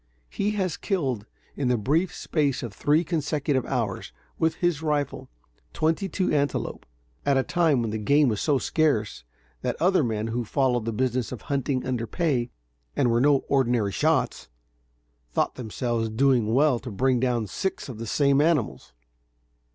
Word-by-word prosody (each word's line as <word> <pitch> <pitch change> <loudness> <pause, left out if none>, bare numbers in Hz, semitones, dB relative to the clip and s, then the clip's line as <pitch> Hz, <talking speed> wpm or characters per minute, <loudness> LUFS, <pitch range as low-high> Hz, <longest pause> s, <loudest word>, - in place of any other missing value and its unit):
He 205 +1 -1
has 185 -5 -1
killed, 130 - -2 0.3
in 140 - -1
the 125 -1 +2
brief 155 - +1
space 145 -5 -1
of 115 -4 -5
three 150 - +2
consecutive 150 -4 -1
hours, 115 -7 -2 0.3
with 160 0 +2
his 175 -4 0
rifle, 150 -3 -2 0.4
twenty 165 +5 0
two 185 +2 0
antelope, 145 -1 -1 0.4
at 140 -1 +2
a 135 - +3
time 160 -7 +2
when 110 - -2
the 110 - -3
game 140 +7 +4
was 110 -4 0
so 145 -3 +2
scarce, 130 - 0 0.4
that - - -2
other 185 -1 +3
men 110 -2 -2
who 120 +2 -1
followed 125 -1 0
the 115 - -1
business 125 0 -1
of 125 - -7
hunting 135 -1 -1
under 125 -3 -2
pay, 130 - 0 0.5
and 120 - +2
were 115 +1 +2
no 140 0 +3
ordinary 120 -6 +2
shots, - - 0 0.8
thought - - 0
themselves 115 -1 -2
doing 120 -1 +2
well 135 0 +3
to 125 - -7
bring 125 +4 +1
down 120 -3 0
six 190 - -3
of 120 -5 -8
the 115 - -5
same 140 +4 +3
animals. 140 - 0
130 Hz, 165 wpm, -25 LUFS, 115-150 Hz, 0.8 s, game